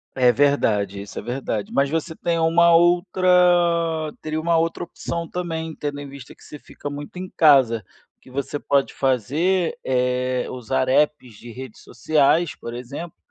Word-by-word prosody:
É 125 -2 +4
verdade 110 -7 +1
isso, 100 - -11
é - - -6
verdade, 120 -4 -4
mas 140 0 +1
você 160 +1 -2
tem 170 +1 -2
uma 165 +1 +4
outra 175 -2 +3
teria 155 0 -3
uma 165 0 +2
outra 165 +1 -1
opção 170 0 -5
também, 160 -2 -4
tendo 145 -1 -5
em 140 - -8
vista 135 -3 -12
que - - -21
você 150 - -11
fica 145 - -8
muito 145 +4 -8
em 185 0 -6
casa, 130 -8 +4 0.4
o - - -52
que - - -19
você 140 +2 -4
pode 140 -1 0
fazer 150 - 0
é 125 0 0
usar 130 +1 -2
apps 135 -5 +1
de 120 - -12
redes 130 -3 -10
sociais, 155 +2 +1
por 115 - -8
exemplo, 140 +7 -7
145 Hz, 165 wpm, -22 LUFS, 130-170 Hz, 0.4 s, É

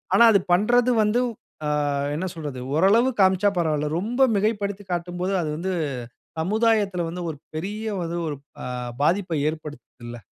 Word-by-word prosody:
ஆனா 235 - +8
அது 200 - +5
பண்றது 240 +6 +3
வந்து 215 +4 +2 0.5
அ - - 0 0.5
என்ன 175 +5 -2
சொல்றது 145 -5 -5 0.2
ஓரளவு 205 +9 +4
காமிச்சா 190 +1 +4
பரவால்ல. 155 -3 +1
ரொம்ப 240 +7 -2
மிகைப்படுத்திக் 205 -2 -1
காட்டும்போது, 175 +2 -2
அது 155 - -2
வந்து 185 +3 -2 0.7
சமுதாயத்துல 205 0 +1
வந்து 180 +2 -5
ஒரு 145 - -10 0.2
பெரிய 205 +7 -4 0.4
ஒரு 145 - -3 0.3
அ - - -4 0.4
பாதிப்பை 175 0 +1
ஏற்படுத்துதுல்ல. 130 -6 -9
185 Hz, 135 wpm, -24 LUFS, 160-210 Hz, 0.7 s, ஆனா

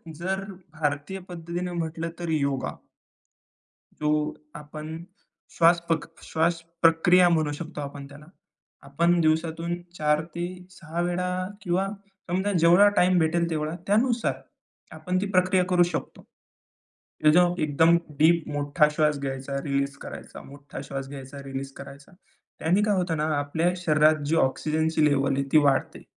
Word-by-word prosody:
जर 190 +4 -3 0.3
भारतीय 150 +4 -2
पद्धतीनं 175 +1 -5
म्हटलं, 165 -1 -3
तर 170 -1 -4
योगा. 140 -4 -1 1.2
जो 150 0 +1 0.4
आपण 155 +1 -7 0.6
श्वासपक 170 -1 +3 0.2
श्वासप्रक्रिया 165 +2 +3
म्हणू 155 -3 +1
शकतो 155 0 -6
आपण 140 0 -7
त्याला. 145 +1 -13 0.6
आपण 170 +5 +1
दिवसातून 165 +2 0 0.2
4-6 170 +2 -3
वेळा 175 +1 -1 0.3
किंवा 185 +1 0 0.4
समजा, 190 +3 0
जेवढा 175 +3 +6
टाईम 180 0 +4
भेटेल 170 +1 +1
तेवढा 155 0 -2
त्यानुसार, 230 +3 +2 0.6
आपण 185 0 -3
ती - - 0
प्रक्रिया 185 0 +3
करू 180 -1 +5
शकतो 175 - -4 1.0
की 150 - +7
जेव्हा 175 +1 +4
एकदम 160 +3 +4 0.2
डीप 165 +1 +4
मोठा 145 +2 +2
श्वास 150 -2 +2
घ्यायचा, 135 0 -4
रिलीज 140 -1 -1
करायचा - - -9
मोठा 140 0 -10
श्वास 135 -1 -6
घ्यायचा, 140 0 -9
रिलीज 135 0 -5
करायचा. 140 +5 -12 0.5
त्याने 180 +6 +2
काय 210 -1 +2
होतं 175 -3 -1
ना, 150 - 0
आपल्या 160 +5 0
शरीरात 155 -3 +3
जी 155 +3 +1
ऑक्सिजनची 155 +3 0
लेव्हल 140 -2 +2
आहे, 140 - 0
ती - - +6
वाढते. 140 -2 0
160 Hz, 130 wpm, -26 LUFS, 145-175 Hz, 1.2 s, की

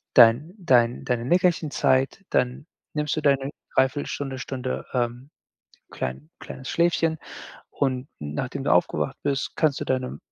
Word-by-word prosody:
dein 125 +8 +6
dein 125 - +3
deine 120 -3 -1
Nickerchenzeit, 160 -2 +2
dann 125 +3 0 0.3
nimmst 150 0 -1
du - - 0
deine 140 -2 +2 0.3
0,75 130 +2 +2
Stunde, 135 -2 -4
Stunde, 130 0 -4
ähm, 120 +2 -2 0.6
klein 65 +4 -5
kleines 130 - -8
Schläfchen. 165 -2 +2 0.5
Und 130 -1 -1
nachdem 75 0 -4
du - - +2
aufgewacht - - +1
bist, 140 -1 -1
kannst 155 -4 +2
du - - -2
deine 130 -1 -1
130 Hz, 135 wpm, -25 LUFS, 125-150 Hz, 0.6 s, dein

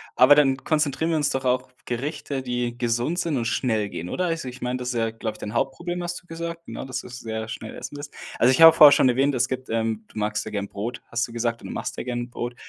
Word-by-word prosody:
Aber 135 +3 +7
dann 135 -3 +4
konzentrieren 150 +2 0
wir 160 - +2
uns 145 -1 +1
doch 135 0 -2
auf 125 0 0
Gerichte, 135 +2 -3
die 120 -1 -2
gesund 120 +8 0
sind 165 -6 0
und 115 - -1
schnell 110 -3 0
gehen, 90 -1 -6
oder? 185 - -1
Also 165 -6 -2
ich 125 +1 -11
meine, 125 +1 -1
das 125 0 -3
ist, 115 -1 -2
glaube 110 -2 -2
ich, - - -16
dein 105 - -6
Hauptproblem, 170 +8 -2
hast 175 0 -4
du 180 - -30
gesagt, 170 0 -6
ne, - - -6
dass 130 - -4
du - - -11
sehr 110 -3 -5
schnell 110 0 -7
essen - - -7
willst. 145 0 -8 0.2
Also, 125 - +5
ich 130 - +2
habe 165 0 +11
vorher 150 -3 +10
schon 130 - +5
erwähnt, 135 +3 +2
es 125 -1 +2
gibt, 130 0 -5
ähm 110 -1 -1
du 110 - -8
magst 105 0 -1
ja 110 - -6
gerne 100 -1 -3
Brot, 105 +6 -5
hast 115 +1 -1
du 115 - -12
gesagt, 115 0 -1
und - - -8
du - - -5
machst - - -4
ja - - -3
gerne 120 -1 -3
'n 120 - -9
Brot. 120 0 -5
125 Hz, 275 wpm, -24 LUFS, 115-145 Hz, 0.2 s, habe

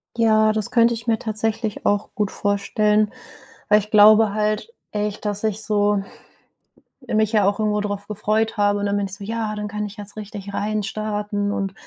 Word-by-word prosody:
Ja, 220 -2 +4
das 215 -2 -1
könnte 235 -1 +4
ich 230 0 -6
mir 225 -2 +2
tatsächlich 220 -1 -3
auch 205 0 +1
gut 210 -2 -1
vorstellen. 210 +1 +1 0.6
Weil 210 0 +6
ich 210 +1 -8
glaube 215 0 +7
halt 215 - -1 0.2
echt, 210 0 -3
dass 205 0 -2
ich 215 0 -1
so 205 -1 +1 1.0
mich 215 -1 +1
ja 210 -3 +4
auch 205 +2 0
irgendwo 210 -1 +1
drauf 205 -1 -4
gefreut 215 +2 -1
habe, 205 0 +2
und 205 - -2
dann 200 0 0
bin 205 - 0
ich 190 - -8
so: 200 - -10
„Ja, 220 0 -3
dann 210 0 -4
kann 210 +1 -4
ich 205 +2 -9
jetzt 205 0 -9
richtig 205 -1 -7
reinstarten.“ 210 0 -2
Und 195 -1 -2
210 Hz, 185 wpm, -22 LUFS, 205-215 Hz, 1.0 s, glaube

